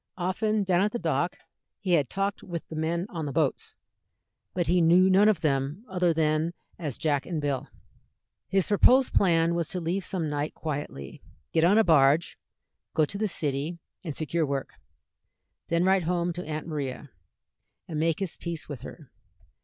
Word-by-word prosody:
Often 205 +4 0
down 185 -2 +2
at 210 +1 +1
the - - 0
dock - - -1 0.4
he 190 -4 -2
had 145 -7 +3
talked 195 0 -2
with 170 -3 -6
the 160 - -6
men 165 +3 -1
on 160 -4 -4
the - - -3
boats, - - -1 0.8
but 175 -2 +1
he 180 +1 +3
knew 180 +3 +5
none 200 +3 +6
of 195 -7 +1
them 145 - -1
other 180 -2 +1
than 160 +1 +1 0.3
as 150 -7 -4
Jack 145 -3 0
and 170 -3 -2
Bill. 145 -3 -2 0.8
His 190 -2 +2
proposed 255 +5 +5
plan 165 -3 +3
was 170 -2 -1
to 180 - -3
leave 175 +3 -2
some 175 -4 -2
night 145 +1 -3
quietly, 145 - -5 0.3
get 160 - +3
on 190 +5 +5
a 225 - +6
barge, 155 -2 +3 0.6
go 155 - +4
to 200 - -6
the 215 - +1
city, 150 -1 -2 0.3
and 155 -6 -5
secure 160 +2 -1
work; 140 -2 -3 0.9
then 170 +1 +1
write 190 -2 +3
home 175 0 0
to 180 0 -6
Aunt 155 0 -4
Maria, 145 -4 -5 0.8
and 155 -3 -3
make 165 +2 +1
his 190 -4 -2
peace 170 -3 -5
with 140 -5 -7
her. 140 0 -11
165 Hz, 175 wpm, -27 LUFS, 150-185 Hz, 0.9 s, none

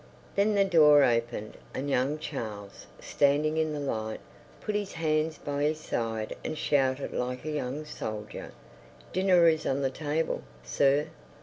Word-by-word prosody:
Then 205 +1 +3
the 200 -1 +4
door 150 -6 +7
opened, 115 -3 0 0.2
and 135 - -3
young 140 +2 +1
Charles, 110 -10 -6
standing 150 +2 +2
in 160 -1 +1
the 150 - -3
light, 110 -6 -3 0.4
put 210 - -3
his 205 -1 -2
hands 155 -1 0
by 145 0 -3
his 155 +1 +1
side 115 -6 -3
and 155 - -3
shouted 135 -2 +1
like 125 +2 -3
a 155 - -2
young 150 0 -3
soldier, 110 -7 -6 0.6
"Dinner 185 -2 +5
is 160 -1 +2
on 135 +1 0
the 135 - +1
table, 155 +3 -1 0.2
sir!" 140 - +2
145 Hz, 150 wpm, -29 LUFS, 125-155 Hz, 0.6 s, door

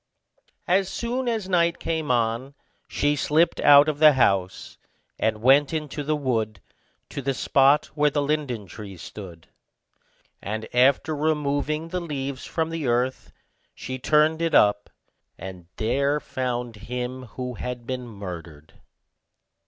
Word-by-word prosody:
As 185 +1 +2
soon 245 +2 -3
as 220 -5 -1
night 170 -2 +2
came 160 -3 -3
on, 120 +3 0 0.3
she 145 0 0
slipped 155 +4 +2
out 145 0 +7
of 150 -2 -2
the 155 -1 +8
house, 95 -7 0 0.4
and 110 0 -1
went 140 +4 +5
into 150 -1 -4
the 155 +2 0
wood, 115 -7 -1 0.5
to 140 - -5
the 135 0 -1
spot 140 +3 +3
where 150 0 +3
the 145 0 -1
linden 140 -7 -2
tree 95 +1 -10
stood; 85 -2 -10 0.9
and 110 +2 -4
after 140 +5 +3
removing 150 +1 -1
the 180 +1 -2
leaves 140 -5 -5
from 160 -1 -2
the 165 -4 -3
earth, 125 +2 -1 0.4
she 130 0 -6
turned 155 +4 +3
it 165 -1 +1
up, 105 0 +4 0.5
and 90 -2 -9
there 140 +6 +1
found 125 -4 -4
him 125 +3 -5
who 125 -1 -4
had 125 +1 -6
been 125 0 -4
murdered. 85 -8 -9
135 Hz, 135 wpm, -24 LUFS, 115-150 Hz, 0.9 s, the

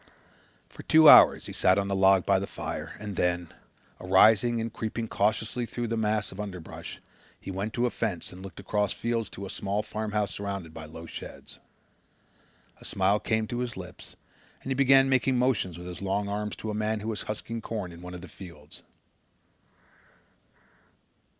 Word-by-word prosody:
For - - -12
two 160 0 +6
hours - - +9
he - - -7
sat 95 +1 +3
on 100 0 0
the 100 - -1
log 95 -1 +5
by 95 -1 +3
the 100 - -4
fire - - -5
and 105 -2 -6
then, 90 -2 0 0.5
arising 110 +5 +4
and 115 0 -3
creeping 115 +1 -3
cautiously 110 +3 0
through 120 - -4
a - - +1
mass 110 -1 0
of 95 - -11
underbrush, 95 -5 -7 0.4
he - - -7
went 100 +3 -3
to 120 0 +1
a 120 - 0
fence 100 -7 -3
and 90 - -11
looked 95 -3 -9
across 105 -2 0
fields 115 -2 -2
to 100 - -7
a - - -7
small 100 +1 -2
farmhouse 105 -3 -2
surrounded 100 -4 -5
by 80 -1 -8
low 80 +2 -10
sheds. - - -8 1.2
A - - -17
smile 100 +2 +2
came 110 0 0
to 120 +2 -4
his 125 -4 -3
lips 90 -1 -10 0.5
and 135 - -4
he - - +3
began 135 0 +5
making 130 -1 +2
motions 115 -9 +1
with 90 - -9
his 90 0 -7
long 100 +1 -1
arms 105 +1 -3
to 110 - -5
a - - -4
man 105 0 -1
who 110 - -5
was 110 -2 -3
husking 115 +2 -5
corn 105 -7 -4
in 85 0 -12
one 90 0 -8
of 90 - -8
the 95 - -9
fields. 85 -7 -11
105 Hz, 185 wpm, -28 LUFS, 95-110 Hz, 1.2 s, hours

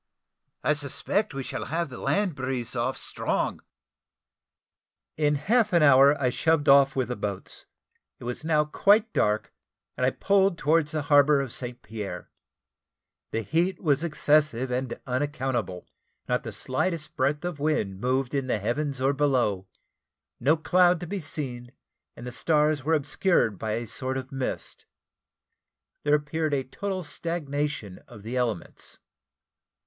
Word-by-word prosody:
I 150 - +3
suspect 145 +8 -1
we 135 - -3
shall - - -5
have 165 +2 -2
the 125 - -9
land 200 -3 +1
breeze 130 -3 -3
off - - -1
strong." - - -2 1.5
In 150 -1 +2
half 215 - +2
an 170 -3 +5
hour 140 +1 +6
I 130 -3 +1
shoved 160 +1 +1
off 140 0 +6
with 130 -3 -1
the 125 - -2
boats. 100 -3 -6 0.5
It - - -12
was 120 +5 -5
now 155 -1 +2
quite 210 +8 +3
dark, 105 +1 0 0.4
and - - -3
I 125 - +5
pulled 195 +4 +2
towards 155 0 +2
the 155 -2 -1
harbour 145 0 +5
of 135 -4 -3
St. 125 -1 -5
Pierre. 105 -2 -7 1.0
The 115 - -2
heat 170 - 0
was 150 -2 +1
excessive 150 -5 +1
and 125 -1 -2
unaccountable; 125 -8 -2 0.4
not - - +1
the - - -6
slightest 155 +4 -2
breath 145 +5 0
of 175 -5 -4
wind 140 -11 -1
moved 130 +1 0
in 135 -2 -1
the 125 - +1
heavens, 135 +6 -2
or 135 +2 +2
below; 125 -10 +1 0.7
no 145 +7 +3
clouds 175 +2 +3
to - - -4
be 195 +2 -4
seen, 130 -6 -5 0.4
and 120 - -10
the 125 - -5
stars 150 +1 +1
were 160 +3 +2
obscured 145 - +1
by 110 -1 -2
a 120 +2 -2
sort 130 +4 -3
of 130 0 -6
mist; 135 -1 -5 1.1
there 145 0 +3
appeared 150 0 -1
a 135 - -1
total 190 +7 -4
stagnation 145 - -3
of 100 - -13
the 115 +4 -5
elements. 120 -7 -3
140 Hz, 150 wpm, -26 LUFS, 125-155 Hz, 1.5 s, hour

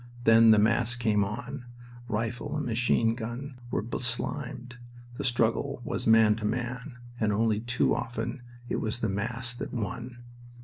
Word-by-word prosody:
Then 115 0 +7
the 110 - +8
mass 115 +3 +3
came 110 -4 +2
on. 125 +6 -5 0.4
Rifle 115 +3 -2
and - - -2
machine 115 -1 +2
gun 125 +3 -6
were - - -1
beslimed. 125 +2 -3 0.4
The - - -3
struggle 120 +3 +1
was - - -3
man 110 -1 +6
to 110 - -4
man, 125 +4 -3 0.2
and 110 -2 +2
only 110 0 +2
too 120 +2 +1
often 115 +2 -3 0.3
it - - -1
was 110 +2 -2
the 110 - +1
mass 115 +5 -2
that 120 - -6
won. 120 +2 -5
120 Hz, 150 wpm, -28 LUFS, 110-125 Hz, 0.4 s, the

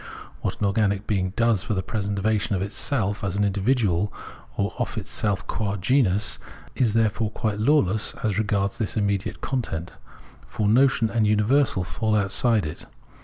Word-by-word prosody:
What - - -3
an - - +1
organic 100 0 +1
being 95 -4 0
does 115 -4 +2
for 105 - -2
the 95 - -1
preservation 100 0 -1
of 95 - -1
itself 105 0 -1
as 100 -2 -2
an 105 - +1
individual, 100 -1 +1 0.5
or 100 +1 -1
of 120 - -2
itself 105 -1 -2
qua 100 -2 -2
genus, 105 -1 +1 0.3
is, 115 -4 +1
therefore, 110 -1 +1
quite 105 -1 -2
lawless 110 -5 +2
as 105 -2 0
regards 100 -2 0
this 110 0 -2
immediate 100 -2 -1
content: 90 -11 -3 0.5
for 105 - -1
notion 120 0 +3
and 110 -2 +2
universal 105 0 +2
fall 110 +4 -1
outside 105 +1 +2
it. 75 - -6
105 Hz, 155 wpm, -24 LUFS, 100-115 Hz, 0.5 s, notion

